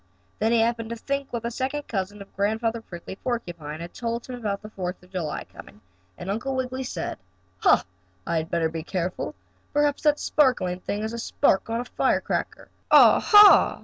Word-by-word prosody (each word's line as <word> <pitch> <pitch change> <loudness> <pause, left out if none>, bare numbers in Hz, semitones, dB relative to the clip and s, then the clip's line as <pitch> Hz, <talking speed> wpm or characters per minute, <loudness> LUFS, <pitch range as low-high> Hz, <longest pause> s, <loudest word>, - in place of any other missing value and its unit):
Then 220 +2 +2
he 235 -1 +4
happened 230 0 0
to 235 - -3
think 275 +4 -3
what 235 -1 -3
the 235 - -2
second 270 +4 -3
cousin 200 0 -4
of 195 - -25
Grandfather 225 +3 0
Prickly 180 -2 -9
Porcupine 170 -11 -4
had 170 +1 -8
told 235 0 -3
him 255 - -8
about 210 -5 -3
Fourth 180 -1 -4
of 180 - -20
July 165 -6 -3
coming, 105 - -14 0.4
and - - -8
Uncle 230 +7 -2
Wiggily 260 0 -2
said: 180 - -5 0.4
"Ha! - - +4 0.4
I 170 - 0
had 160 +1 -2
better 170 -1 +1
be 160 0 -5
careful. 180 +2 -3 0.4
Perhaps 295 -1 +2
that 300 -1 +3
sparkling 250 -11 +2
thing 205 +3 -3
is 220 +1 -3
a 235 - -4
spark 225 -4 +1
on 230 +1 -1
a - - -7
firecracker. - - -1 0.2
Ah, - - +8
ha!" 415 -1 +7
225 Hz, 185 wpm, -25 LUFS, 180-250 Hz, 0.4 s, Ah